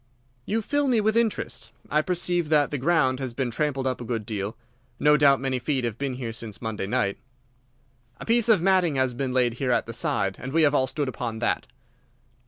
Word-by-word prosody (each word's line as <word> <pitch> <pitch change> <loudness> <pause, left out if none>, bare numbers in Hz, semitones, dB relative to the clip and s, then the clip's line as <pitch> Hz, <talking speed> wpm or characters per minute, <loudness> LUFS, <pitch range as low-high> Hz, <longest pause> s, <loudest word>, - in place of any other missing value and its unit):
"You 220 +1 0
fill 290 +5 0
me 245 -4 +3
with 215 +1 +1
interest, 230 -2 -1 0.2
I 150 - +3
perceive 175 -1 0
that 150 -2 +3
the 145 - -2
ground 135 -3 +2
has 130 -3 -4
been 130 -2 -1
trampled 135 +1 -1
up 130 -1 -1
a - - -4
good 115 -3 -3
deal. 105 -1 -4 0.4
No 150 0 +5
doubt 140 -2 +5
many 130 -1 -1
feet 135 0 -1
have 115 -2 -3
been 135 -2 -2
here 120 -3 -5
since 115 -2 -7
Monday 110 -4 -4
night." 100 -1 0 1.0
"A - - -7
piece 235 0 +2
of 205 -7 +5
matting 185 -5 +3
has 130 -1 +1
been 130 +1 -2
laid 125 -2 +2
here 135 - -1
at 120 - +1
the 115 - -7
side, 95 -3 0
and 130 +2 -6
we 165 0 +4
have 145 -1 +4
all 130 -2 +2
stood 145 -2 -2
upon 120 -3 -4
that." 120 +1 -1
135 Hz, 215 wpm, -25 LUFS, 120-160 Hz, 1.0 s, No